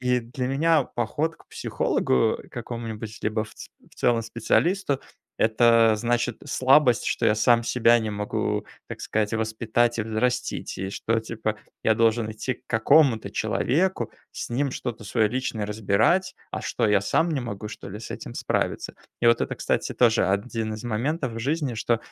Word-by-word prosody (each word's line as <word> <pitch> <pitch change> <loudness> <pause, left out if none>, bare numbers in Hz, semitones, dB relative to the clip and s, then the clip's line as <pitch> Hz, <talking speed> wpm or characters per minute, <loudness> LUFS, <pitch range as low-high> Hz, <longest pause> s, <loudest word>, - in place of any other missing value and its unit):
И 125 -1 +1
для 125 +2 -4
меня 155 +3 +3
поход 145 +9 -2
к - - -22
психологу, 65 - +1
э, - - -18
какому-нибудь, 115 -2 -6
либо 110 0 0
в - - -15
ц - - -10 0.2
в - - -21
целом 120 -2 +2
специалисту- 140 - +1 0.4
это 115 0 +4
значит 120 +1 0
слабость, 130 -2 +4
что - - +1
я 105 - +4
сам 115 +2 +3
себя 120 -1 +4
не 110 -1 -3
могу, 105 0 -2 0.2
так - - -8
сказать, 105 -1 -1
воспитать 110 +1 0
и - - +1
взрастить. 125 +3 -2
И 95 +1 -3
что, 115 +3 0
типа, 110 -1 -3 0.3
я 110 - +3
должен 115 0 +2
идти 110 +4 -3
к - - -24
какому-то 115 +1 +4
человеку, 180 +8 0 0.2
с - - -6
ним 135 +4 0
что-то 120 -3 -5
свое 110 +2 +1
личное 115 -2 -2
разбирать. 110 - +1 0.2
А - - -3
что, - - 0
я 105 -1 +4
сам 165 - +1
не 145 -4 -1
могу, 105 -4 -5
что 105 - -8
ли, 100 +2 -7
с 110 - -7
этим - - -7
справиться? - - -2 0.3
И 120 - +2
вот 115 - +5
это, - - -2
кстати, - - -1
тоже 115 -2 +3
один 110 +3 -1
из 110 - -9
моментов 125 +4 -1
в 115 - -6
жизни- 140 0 -1
что, 115 +1 0
115 Hz, 175 wpm, -25 LUFS, 110-125 Hz, 0.4 s, вот